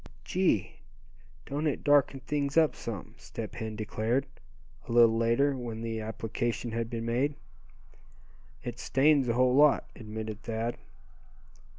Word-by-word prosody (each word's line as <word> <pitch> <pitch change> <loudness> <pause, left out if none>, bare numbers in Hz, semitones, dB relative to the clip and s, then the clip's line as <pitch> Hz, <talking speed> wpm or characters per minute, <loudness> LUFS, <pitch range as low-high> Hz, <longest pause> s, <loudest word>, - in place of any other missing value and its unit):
"Gee! 180 - +1 0.7
don't 150 +3 -2
it 145 - -2
darken 145 -2 +3
things 140 +3 -1
up 160 -2 +4
some," 105 -7 -6
Step - - -7
Hen 110 -1 -5
declared, 110 +4 -1 0.6
a - - -5
little 115 -1 +6
later, 115 +5 +2
when 115 -3 -5
the 115 -1 -3
application 115 +1 -3
had 115 0 -2
been 115 -1 -4
made. 130 +5 0 1.3
"It 120 0 -6
stains 135 +1 +3
a 115 - +2
whole 125 +1 +3
lot," 145 +1 +4
admitted 110 -1 -6
Thad. 115 +1 -3
120 Hz, 130 wpm, -29 LUFS, 115-140 Hz, 1.3 s, little